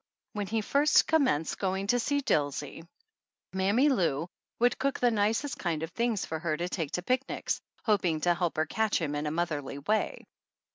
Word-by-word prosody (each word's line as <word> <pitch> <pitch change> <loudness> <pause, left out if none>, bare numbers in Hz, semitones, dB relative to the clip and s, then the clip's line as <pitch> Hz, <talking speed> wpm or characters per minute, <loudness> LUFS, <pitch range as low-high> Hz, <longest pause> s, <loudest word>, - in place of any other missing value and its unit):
When 205 -1 -3
he 225 +1 0
first 285 +7 +4
commenced 260 - +1
going 190 0 -1
to 245 +4 +2
see 285 +4 0
Dilsey 145 - -1 0.7
Mammy 200 +9 +3
Lou 170 - +1 0.3
would 245 +1 +2
cook 275 +1 0
the 245 -1 +3
nicest 225 +6 0
kind 165 -3 -1
of 165 - -5
things 235 -3 0
for 160 - -4
her 155 -1 -1
to 175 - -2
take 165 -5 -3
to 180 - -2
picnics, 255 +5 -1 0.2
hoping 185 -8 +2
to 175 +1 +3
help 175 -2 -2
her 155 - +2
catch 220 +2 0
him 155 -4 -2
in 145 +1 -2
a - - +1
motherly 150 -4 -2
way. 210 +10 -1
190 Hz, 185 wpm, -29 LUFS, 160-235 Hz, 0.7 s, first